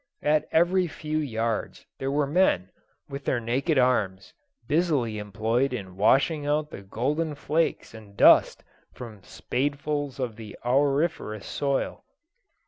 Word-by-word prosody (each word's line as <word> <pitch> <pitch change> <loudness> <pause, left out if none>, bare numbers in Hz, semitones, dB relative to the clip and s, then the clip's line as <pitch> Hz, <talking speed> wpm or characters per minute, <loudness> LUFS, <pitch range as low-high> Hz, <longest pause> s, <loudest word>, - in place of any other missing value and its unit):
At 150 +1 +2
every 180 +2 +3
few 155 0 -3
yards 115 -6 -3
there 135 - -2
were 145 +1 +1
men, 140 - +2 0.4
with 140 0 -7
their 130 - 0
naked 135 +7 0
arms, 105 -8 +1 0.3
busily 145 -9 +1
employed 110 +6 -1
in 95 -6 -6
washing 135 - +3
out 150 +1 0
the - - -8
golden 145 +10 -2
flakes 155 -1 -1
and 105 -3 -13
dust - - +5 0.3
from 110 -5 -10
spadefuls 145 +5 -3
of 120 -4 -3
the 110 -2 -10
auriferous 135 - 0
soil. 140 -1 -2
135 Hz, 130 wpm, -26 LUFS, 110-150 Hz, 0.4 s, dust